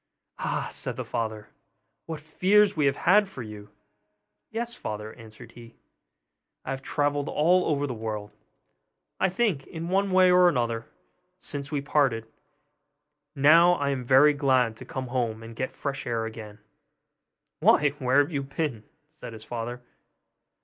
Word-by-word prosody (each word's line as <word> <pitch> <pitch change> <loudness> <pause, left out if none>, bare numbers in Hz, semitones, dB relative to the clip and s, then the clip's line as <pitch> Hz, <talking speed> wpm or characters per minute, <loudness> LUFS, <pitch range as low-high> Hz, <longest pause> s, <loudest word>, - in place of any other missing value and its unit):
'Ah!' - - -2
said - - -3
the - - -5
father, 110 -2 -4 0.6
'what 160 -2 -5
fears 195 +7 +3
we 150 -3 +2
have 135 - +1
had 205 +6 +4
for 135 -10 -8
you!' 105 -1 -10 0.8
'Yes, 235 +1 -3
father,' 105 - -6
answered 115 0 -13
he; 115 -1 -14 0.9
'I - - -4
have 135 0 -4
travelled 145 +1 -1
all 180 +4 +3
over 145 -2 0
the 130 - -4
world, 110 -2 -5 0.9
I 190 - +3
think, 185 -8 -1
in 165 +1 -6
one 195 +2 +1
way 185 -1 +5
or 180 -4 +5
other, 115 -1 -2 0.5
since 140 -5 -6
we 145 -2 -1
parted; 140 -6 +1 1.1
and 135 - -5
now 170 +4 +7
I 145 -4 -1
am 130 -2 -3
very 135 +4 +6
glad 130 -5 +2
to 125 - -10
come 130 0 -5
home 115 -3 -2
and 115 0 -10
get 130 +2 -3
fresh 140 -2 -5
air 115 -2 -1
again.' 110 -2 -8 1.0
'Why, 150 - +5
where 130 +1 +2
have 145 +4 -3
you 140 - -1
been?' 135 -4 -4 0.2
said 155 -6 -11
his 110 -1 -10
father. 120 +2 -6
135 Hz, 155 wpm, -26 LUFS, 115-160 Hz, 1.1 s, now